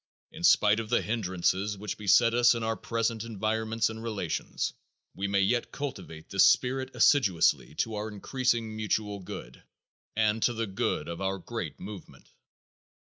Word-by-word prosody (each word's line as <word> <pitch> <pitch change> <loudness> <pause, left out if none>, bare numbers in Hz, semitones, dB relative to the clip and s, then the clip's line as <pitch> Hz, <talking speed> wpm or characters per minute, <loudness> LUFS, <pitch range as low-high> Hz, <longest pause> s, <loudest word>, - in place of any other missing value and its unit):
In - - -10
spite 105 +1 +5
of 110 -1 -5
the 120 - +2
hindrances 100 -1 -1
which 105 +1 -4
beset 115 +3 +4
us 120 0 +5
in 115 - -3
our 110 0 0
present 115 +1 -2
environments 110 0 -1
and 110 0 -6
relations, 105 -7 -3 0.4
we 100 +1 -3
may 100 0 +2
yet 120 +5 +1
cultivate 80 - -6
this 95 - +5
spirit 130 +1 +2
assiduously 95 - +3
to 115 - -1
our 105 +1 -3
increasing 115 +1 -1
mutual 105 -1 -2
good 90 - -9 0.5
and 110 0 +1
to 120 - +2
the 115 0 -2
good 95 -6 -2
of 85 +2 -6
our 95 0 -1
great 95 -8 -6
movement. 100 -2 -10
110 Hz, 155 wpm, -28 LUFS, 100-115 Hz, 0.5 s, spite